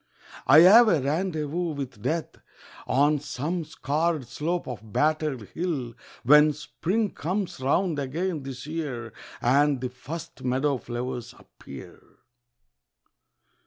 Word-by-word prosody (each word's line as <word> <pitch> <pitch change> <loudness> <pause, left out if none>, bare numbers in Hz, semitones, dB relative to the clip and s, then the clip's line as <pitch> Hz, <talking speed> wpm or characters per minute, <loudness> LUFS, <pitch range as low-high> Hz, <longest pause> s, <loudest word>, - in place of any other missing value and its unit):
I 145 +5 +9
have 220 +7 +8
a 170 -8 +4
rendezvous 160 +2 -1
with 130 -6 -6
Death 160 +7 -2 0.5
On 145 +3 +3
some 150 +5 -3
scarred 155 0 -1
slope 160 +7 -3
of 110 -4 -8
battered 150 -5 0
hill, 150 -9 -3 0.3
When 150 +4 +6
Spring 185 +8 -2
comes 185 +1 -3
round 150 +4 +1
again 160 +4 -2
this 135 -1 -7
year 140 -8 -5 0.3
And 140 +2 +3
the 125 0 -3
first 145 +6 -9
meadow 130 +2 0
flowers 120 0 -5
appear. 70 - -13
150 Hz, 115 wpm, -26 LUFS, 130-165 Hz, 0.5 s, I